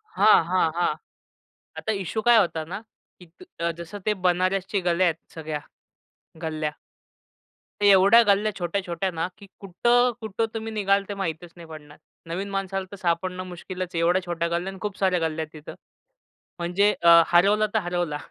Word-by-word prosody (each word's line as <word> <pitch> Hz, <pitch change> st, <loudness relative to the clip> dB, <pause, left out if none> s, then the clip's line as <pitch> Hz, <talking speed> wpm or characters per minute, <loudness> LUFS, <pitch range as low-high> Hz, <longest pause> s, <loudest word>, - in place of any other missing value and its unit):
हां, 215 Hz, -, +4 dB
हां, 180 Hz, -2 st, +2 dB
हां. 175 Hz, -3 st, +1 dB, 0.8 s
आता 220 Hz, -, -2 dB
इश्शु 200 Hz, +2 st, -3 dB
काय 240 Hz, 0 st, +6 dB
होता 165 Hz, -5 st, 0 dB
ना 190 Hz, +6 st, -6 dB, 0.4 s
की 180 Hz, -, -14 dB
त 165 Hz, -, -17 dB, 0.2 s
अ, 170 Hz, 0 st, 0 dB
जसं 170 Hz, +5 st, -8 dB
ते 210 Hz, -, +2 dB
बनारसच्या 185 Hz, +2 st, +1 dB
गल्या 175 Hz, +1 st, +2 dB
आहेत, 165 Hz, -2 st, +1 dB, 0.2 s
सगळ्या 155 Hz, -2 st, -5 dB, 0.8 s
गल्ल्या, 155 Hz, -1 st, -2 dB, 1.1 s
तर -, -, 0 dB
एवढ्या 200 Hz, +4 st, +7 dB
गल्ल्या 210 Hz, +2 st, +2 dB
छोट्या-छोट्या 185 Hz, +1 st, -2 dB
ना, 165 Hz, +1 st, -3 dB
की 200 Hz, -, -13 dB
कुठं-कुठं 230 Hz, +2 st, +1 dB
तुम्ही 225 Hz, 0 st, -5 dB
निघाल 200 Hz, -1 st, +1 dB
ते 205 Hz, -, -4 dB
माहीतच 165 Hz, 0 st, -5 dB
नाही 170 Hz, -1 st, -11 dB
पडणार. 150 Hz, -2 st, -12 dB, 0.3 s
नवीन 190 Hz, +4 st, -4 dB
माणसाला 195 Hz, -1 st, -3 dB
तर -, -, -7 dB
सापडणं 180 Hz, 0 st, -2 dB
मुश्किलच 185 Hz, 0 st, -6 dB
आहे, 165 Hz, -, 0 dB
एवढ्या 175 Hz, +3 st, +2 dB
छोट्या 170 Hz, -1 st, -2 dB
गल्ल्या 175 Hz, +3 st, -2 dB
आणि 190 Hz, -, -12 dB
खूप 205 Hz, -2 st, -4 dB
साऱ्या 185 Hz, -3 st, +2 dB
गल्ल्या 160 Hz, 0 st, -3 dB
आहेत 155 Hz, 0 st, -13 dB
तिथं. -, -, -9 dB, 0.8 s
म्हणजे 185 Hz, +5 st, +2 dB
अ, 170 Hz, 0 st, +8 dB
हरवला 200 Hz, +5 st, +4 dB
तर -, -, +4 dB
हरवला. 175 Hz, -4 st, -2 dB
185 Hz, 165 wpm, -24 LUFS, 170-200 Hz, 1.1 s, अ